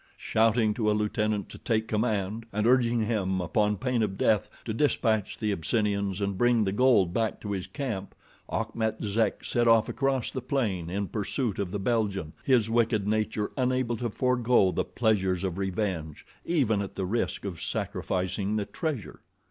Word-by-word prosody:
Shouting 110 -1 +2
to 105 -1 0
a - - +3
lieutenant 105 -1 0
to - - -11
take 110 -2 0
command, 110 0 -1
and 105 +2 -1
urging 120 -2 +3
him 95 -4 0
upon 105 +5 +1
pain 125 +2 0
of 100 -3 -1
death 105 -1 +2 0.2
to 110 - -2
dispatch 110 -5 +1
the 110 -2 -1
Abyssinians 100 +1 0
and 100 -1 -2
bring 120 -2 +4
the 95 - 0
gold 105 -6 +4
back 110 0 0
to 105 - -5
his 95 -2 -3
camp, 110 -10 -4 0.3
Achmet 110 -1 -2
Zek 105 0 0
set 120 -1 +1
off 115 -1 +5
across 135 -3 0
the 130 - -4
plain 110 -10 -1
in 100 +2 -2
pursuit 105 +2 -2
of 100 -3 -1
the 105 - -3
Belgian, 100 -6 -1
his 125 -5 +3
wicked 115 -3 +1
nature 110 -1 0
unable 130 -2 0
to 120 0 -2
forego 125 -4 +2
the - - -1
pleasures 95 -6 +1
of 95 -1 -2
revenge, 95 -5 -3 0.2
even 120 -12 +2
at 100 - -6
the 95 - -2
risk 110 +1 -2
of 90 -4 -5
sacrificing 95 +5 -2
the 105 -2 0
treasure. 130 - -4
105 Hz, 170 wpm, -28 LUFS, 100-120 Hz, 0.3 s, off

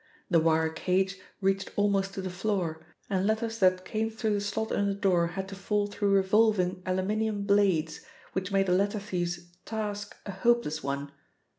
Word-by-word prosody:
The 170 - +6
wire 160 0 +3
cage 190 +4 0 0.2
reached 195 0 +1
almost 195 -1 +1
to 190 - -4
the 185 - -3
floor, 180 -4 -2 0.2
and 190 0 0
letters 225 +1 -1
that 185 -1 +3
came 220 +1 -1
through 220 -1 -1
the 205 - 0
slot 210 +2 -2
in 200 - +1
the 200 - 0
door 180 -4 +2
had 190 +3 -5
to 195 - -7
fall 205 +2 0
through 205 0 0
revolving 195 -2 +3
aluminium 205 +3 0
blades, 195 -6 +2 0.3
which 190 +1 -2
made 195 0 +3
the 180 - +2
letter 200 +3 +2
thief's 175 -3 -3
task 205 -2 -4
a 200 - -4
hopeless 195 -6 +1
one. 140 +1 -3
195 Hz, 175 wpm, -29 LUFS, 180-205 Hz, 0.3 s, The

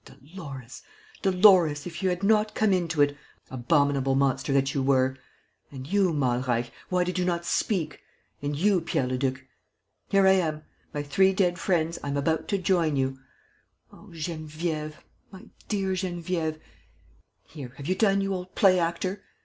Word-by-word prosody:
Ah, - - -14
Dolores, 135 -4 -10 0.4
Dolores, 180 -6 +5
if 170 -1 -7
you 190 - +2
had 180 +2 -3
not 215 +1 +2
come 215 -3 +2
into 165 -5 +2
it, 145 0 0 0.4
abominable 135 0 +1
monster 135 +1 +1
that 135 0 +2
you 140 - 0
were!...... 130 -1 +2 0.6
And 130 -2 -8
you, 190 +3 +2
Malreich, 125 -4 0 0.2
why 180 -1 +2
did 180 0 -2
you - - +1
not 170 -1 -1
speak?... 170 -4 -1 0.4
And 145 +1 -2
you, 190 +3 +2
Pierre 150 -5 0
Leduc.... 130 +1 -2 0.6
Here 195 -1 +4
I 190 - +7
am!... 160 -5 0 0.3
My 145 -1 -3
three 190 +7 +3
dead 180 -2 +1
friends, 170 -2 0
I - - -4
am 140 0 -1
about 160 +3 0
to 200 - 0
join 170 -5 +1
you.... 135 0 -1 0.7
Oh, - - -16
Geneviève, 155 -1 -4 0.4
my 190 -2 -13 0.2
dear 195 -3 -1
Geneviève!... 175 -3 -2 0.8
Here, 135 -6 -10
have 140 - -8
you 185 - +1
done, 195 0 +2
you 195 0 -1
old 185 0 -6
play 185 -2 +5
actor? 175 +3 -2
165 Hz, 165 wpm, -26 LUFS, 140-185 Hz, 0.8 s, I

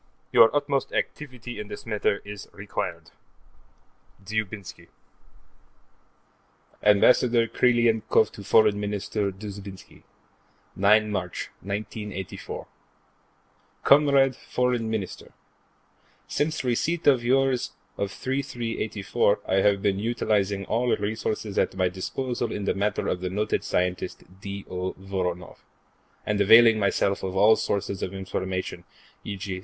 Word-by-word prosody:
Your 115 - +7
utmost 145 -1 0
activity 125 -5 -4
in 105 - -6
this - - -8
matter 105 -2 0
is 105 -1 -8
required. 100 0 -5 1.1
Dzhoubinsky 100 -4 -4 1.9
Ambassador 115 +3 +5
Krylenkoff 115 -2 +3
to 100 - -10
Foreign 105 0 +4
Minister 105 0 -2
Dzhoubinsky: 100 -1 -10 0.7
9 105 +2 +4
March, 90 -4 -4
1984 100 -1 -6 1.2
Comrade 140 -2 +5
Foreign 125 -3 -1
Minister: 110 -5 -5 0.9
Since 155 -1 -1
receipt 155 +7 0
of 130 -4 +5
yours 130 0 +1 0.2
of 100 - -2
3/3/'84, 115 -5 -1
I 95 - +2
have 100 0 +3
been 100 -1 +1
utilizing 105 -3 0
all 120 +4 +1
resources 105 0 -2
at - - 0
my 95 -1 +1
disposal 120 +6 -3
in 105 - -4
the - - +1
matter 100 +1 -1
of 90 - -1
the 90 - -2
noted 105 +3 -1
scientist 90 0 -2 0.2
D. 100 -1 -6
O. 90 +1 -3
Voronoff, 90 -2 -4 0.7
and 105 -1 0
availing 115 +2 +7
myself 100 -1 +1
of 95 0 -4
all 105 +3 +6
sources 100 -1 -2
of 95 - -4
information, 95 -2 -4 0.4
e.g. 95 -2 -5
105 Hz, 110 wpm, -26 LUFS, 95-120 Hz, 1.9 s, Your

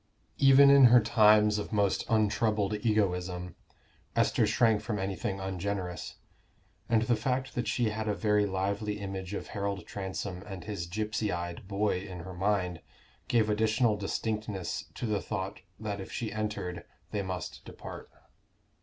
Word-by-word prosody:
Even 140 0 +8
in 140 -2 +8
her 125 0 +8
times 105 -2 +5
of - - -5
most 100 -3 +1
untroubled 105 -1 +2
egoism, 90 -5 0 0.6
Esther - - +3
shrank 110 -3 +3
from 110 -1 -3
anything 95 0 -3
ungenerous; 95 -1 -4 0.7
and 115 -1 +3
the 120 +1 +2
fact 130 +4 -1
that 120 - -2
she 120 -3 +1
had 110 0 -3
a 105 - +1
very 105 +2 +2
lively 100 +2 -2
image 95 -1 -5
of - - -6
Harold 100 -1 -3
Transome 95 -1 -5
and 95 -3 -7
his 100 -5 -4
gypsy 105 +2 -2
eyed 85 +5 -5
boy 100 -1 0
in 90 -2 -7
her 95 +2 -8
mind, 90 -2 0 0.5
gave 115 -3 +3
additional 110 +1 +2
distinctness 105 -2 -3
to - - -4
the 105 -3 0
thought 100 -1 -4 0.2
that 105 -2 -4
if 95 - -9
she 110 -3 -3
entered 105 -5 -3 0.3
they 105 - -1
must 95 -2 -5
depart. - - -9
105 Hz, 150 wpm, -30 LUFS, 95-110 Hz, 0.7 s, Even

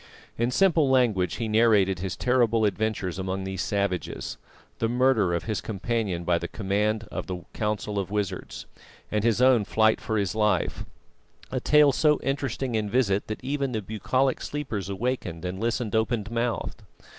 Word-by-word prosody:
In 120 +1 0
simple 160 0 +3
language 110 -10 +2
he 115 - -3
narrated 105 -4 +3
his 95 0 -3
terrible 120 -3 +2
adventures 100 -3 -1
among 95 0 -3
these 95 0 -4
savages, 100 -3 -2 0.4
the 115 - +1
murder 120 -7 +3
of 85 - -2
his 110 -1 -2
companion 105 -4 -2
by 85 0 +2
command 105 +4 -1
of - - -5
the 90 -2 -5
Council 105 -1 -2
of 95 - -3
Wizards, 105 -2 -3 0.5
and 105 -1 0
his 115 +1 +2
own 130 -4 +5
flight 110 +2 +2
for 110 - -1
his 100 -2 0
life; 105 -5 0 0.7
a 130 - -1
tale 150 +2 +5
so 150 +2 +3
interesting 135 -2 -2
and 105 -1 -1
vivid 105 -4 +1
that 110 - -5
even 140 -1 -1
the 110 - -1
bucolic 130 +6 0
sleepers 115 -10 -4
awakened 95 -5 -3
and 90 +1 -4
listened 115 0 -1
open 110 -1 +1
mouthed. 115 -1 -2
110 Hz, 160 wpm, -26 LUFS, 100-125 Hz, 0.7 s, own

